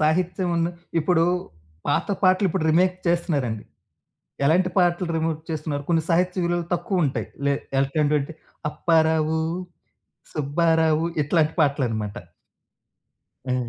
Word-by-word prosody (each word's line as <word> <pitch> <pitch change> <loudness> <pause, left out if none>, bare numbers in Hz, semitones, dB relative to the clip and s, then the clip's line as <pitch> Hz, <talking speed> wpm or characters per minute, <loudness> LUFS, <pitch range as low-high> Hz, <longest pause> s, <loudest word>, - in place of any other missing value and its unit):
సాహిత్యమన్న 170 +1 +1 0.3
ఇప్పుడూ 165 +1 +3 0.6
పాత 145 - +1 0.2
పాటలిప్పుడు 185 -2 +3
రీమేక్ 180 +3 +3
చేస్తన్నారండి. 145 - 0 0.8
ఎలాంటి 180 +5 +3
పాటలు 175 0 +2
రీమేక్ 160 -1 -1
చేస్తన్నారు, 150 -2 -3
కొన్ని 165 -2 +2
సాహిత్య 180 +2 +2
విలువలు 175 -1 -1
తక్కువుంటాయి. 175 -5 -1 0.2
లే 140 - +3 0.2
ఎల్ 135 0 +1
ఏంటంటే, 150 +1 0 0.4
అప్పారావు, 160 -1 +2 0.9
సుబ్బారావు 160 +2 +2 0.2
ఇట్లాంటి 155 +1 +2
పాటలనమాట. 120 -8 0 1.3
హ్మ్. 125 -2 -1
160 Hz, 95 wpm, -24 LUFS, 145-175 Hz, 1.3 s, ఇప్పుడూ